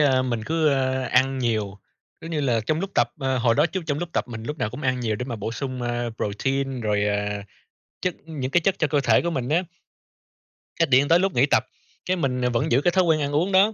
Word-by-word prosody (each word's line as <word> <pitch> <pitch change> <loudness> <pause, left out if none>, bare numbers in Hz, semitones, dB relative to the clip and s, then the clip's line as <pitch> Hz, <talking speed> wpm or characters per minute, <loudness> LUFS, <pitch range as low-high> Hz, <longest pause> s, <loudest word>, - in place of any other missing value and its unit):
a, 135 -3 +4
mình 120 -4 -2
cứ, 160 0 +2
a, 130 -1 0
ăn 135 +1 +3
nhiều, 110 -5 -1 0.4
giống 165 - -8
như 155 -2 -1
là, 120 -5 +1
trong 155 +1 0
lúc 195 +1 -3
tập, 120 0 +2
à, 130 -1 0
hồi 115 -1 +3
đó 155 - +4
trước 190 +3 -4
trong 145 -2 -1
lúc 175 +1 -3
tập - - -1
mình 115 -1 -7
lúc 150 +5 -5
nào 105 - -1
cũng 130 +6 -8
ăn 130 -2 0
nhiều 110 -3 -1
để 125 - -4
mà 120 -2 -5
bổ 110 +2 -4
sung, 130 +1 -4
ơ, 120 0 -2
protein 135 +6 -2
rồi, 105 -2 +1
à, 105 0 -1 0.6
chất 180 -2 -1
những 140 -5 -4
cái 175 - +3
chất 190 +3 +2
cho 155 - +2
cơ 145 -1 +1
thể - - +4
của 170 - -1
mình 130 -6 -3
á. 165 +4 +2 1.1
Cái - - +3
điện 135 +2 +4
tới 170 +3 +5
lúc 190 0 +1
nghỉ 125 +3 +4
tập, - - +2 0.4
cái 185 0 0
mình 130 -5 -1
vẫn 125 -1 0
giữ 130 +4 +4
cái 175 - +3
thói 185 +1 +3
quen 160 -3 +3
ăn 145 0 -1
uống 165 +7 +1
đó, 200 +3 +5
130 Hz, 260 wpm, -24 LUFS, 120-155 Hz, 1.1 s, tới